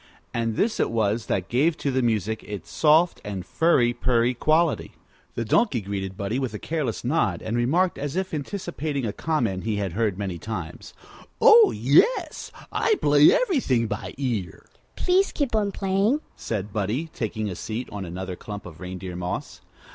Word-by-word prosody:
And 115 -2 -1
this 220 - 0
it - - +2
was 110 -1 0
that 95 -2 -1
gave 150 +7 +2
to 140 - -1
the 130 0 +1
music 110 -2 0
its 100 -4 -8
soft 160 +3 +3
and 100 -3 -5
furry 125 -7 +3
purry 120 0 +1
quality. 155 +6 +1 0.4
The 115 - -2
Donkey 135 - +2
greeted 95 -2 -5
Buddie 105 +5 -2
with 125 -5 -3
a - - -2
careless 150 -3 -3
nod, 120 - 0
and 110 - -2
remarked, 165 +10 +1
as 145 +2 -3
if 190 -1 -2
anticipating 155 - -3
a 105 - -2
comment 115 - -1
he 110 -1 -1
had 100 -3 -2
heard 105 -2 0
many 95 -4 -4
times: 90 -5 -7 0.4
"Oh, 445 -1 +8
yes; - - +2 0.2
I 440 - +2
play 145 - +6
everything 260 - +2
by 115 - -5
ear." 115 - -3 0.3
"Please 375 +2 +2
keep 275 -6 -1
on 205 -2 +1
playing," 195 +9 +1
said 105 -2 -4
Buddie, 110 - -2
taking 110 -2 -3
a 95 - -4
seat 115 +7 -5
on 105 -1 -5
another 90 +1 -5
clump 105 +2 -8
of 85 -3 -11
reindeer 90 0 -6
moss. 90 0 -5
120 Hz, 170 wpm, -25 LUFS, 100-160 Hz, 0.4 s, Oh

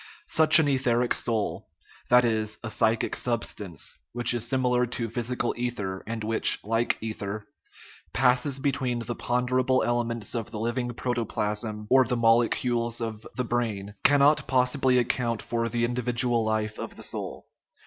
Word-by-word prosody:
Such 155 -1 +7
an 160 -3 +4
etheric 125 -3 +1
soul 110 -3 -2 0.4
that 125 0 +6
is 110 -2 0
a 110 - -4
psychic 110 0 +1
sub 120 -2 0
stance 90 -7 -5
which 120 0 +4
is 120 -1 -2
similar 125 -1 +1
to 115 -2 -3
physical 120 0 -1
ether, 105 -6 -4
and 115 -1 -4
which, 110 +1 +3
like 115 +3 0
ether, 110 -1 -5 0.7
passes 130 +2 +2
between 130 -3 -1
the 120 - -3
ponderable 125 +2 0
elements 120 -2 -1
of 115 -2 -3
the 105 - -6
living 120 +2 -2
protoplasm 105 -3 -3
or 130 0 +7
the 125 0 -1
molecules 115 0 +1
of 115 -2 -5
the 125 - -2
brain, 110 -4 -2
cannot 145 +1 +4
possibly 130 0 +2
account 120 -1 0
for 115 0 -2
the 120 0 0
individual 120 -1 +1
life 110 -1 -2
of - - -6
the - - -9
soul. - - -5
120 Hz, 150 wpm, -26 LUFS, 110-125 Hz, 0.7 s, Such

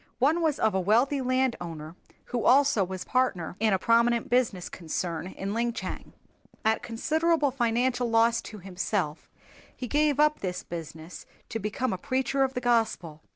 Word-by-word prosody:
One 300 +7 +2
was 315 -3 +2
that - - -5
of 220 -2 +3
a 190 - +1
wealthy 240 +9 +2
landowner 180 -12 -2 0.3
who 240 -2 -3
also 270 -5 +4
was 185 0 -5
partner 225 -11 0
in 220 0 +2
a 190 - +3
prominent 235 +3 +2
business 230 -8 +1
concern 170 0 -4
in 195 +1 -5
Linchang. 235 +1 -3 0.5
At 220 0 +2
considerable 310 +5 +1
financial 245 0 0
loss 230 +1 +3
to 215 - -9
himself 180 -4 -3 0.5
he 250 - -5
gave 295 +1 +2
up 300 0 +4
this 180 -2 -4
business 165 0 -8 0.2
to 225 - -3
become 220 +4 -2
a - - -4
preacher 270 0 -1
of 265 0 -1
the 250 - -2
Gospel. 225 -10 0
230 Hz, 160 wpm, -27 LUFS, 185-260 Hz, 0.5 s, also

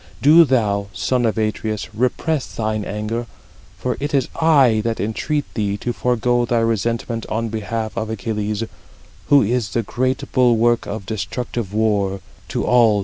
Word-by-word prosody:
Do 155 +7 +7
thou, 105 -7 +1
son 120 +5 +1
of 110 - -1
Atreus, 110 -1 -2
repress 130 +6 0
thine 110 -1 -1
anger; 105 +3 -3 0.5
for 125 -2 -2
it 145 +1 -1
is 135 - +1
I 145 -8 +5
that 115 -1 -1
33 - - -1
entreat 145 +7 -2
thee 100 -2 -1
to 120 +4 -3
forego 120 0 +1
thy 120 0 0
resentment 115 0 -1
on 115 +1 -1
behalf 110 +1 -3
of 110 -1 -3
Achilles, 105 0 -2 0.6
who 145 -1 +6
is 115 -1 0
the 115 +4 -1
great 130 +4 -1
bulwark 120 -2 +3
of 100 -1 -5
destructive 110 +1 -4
war 100 -3 +1 0.3
to - - -2
all 120 -2 +5
the 105 - +2
Achæans." - - +1
115 Hz, 165 wpm, -20 LUFS, 105-125 Hz, 0.6 s, Do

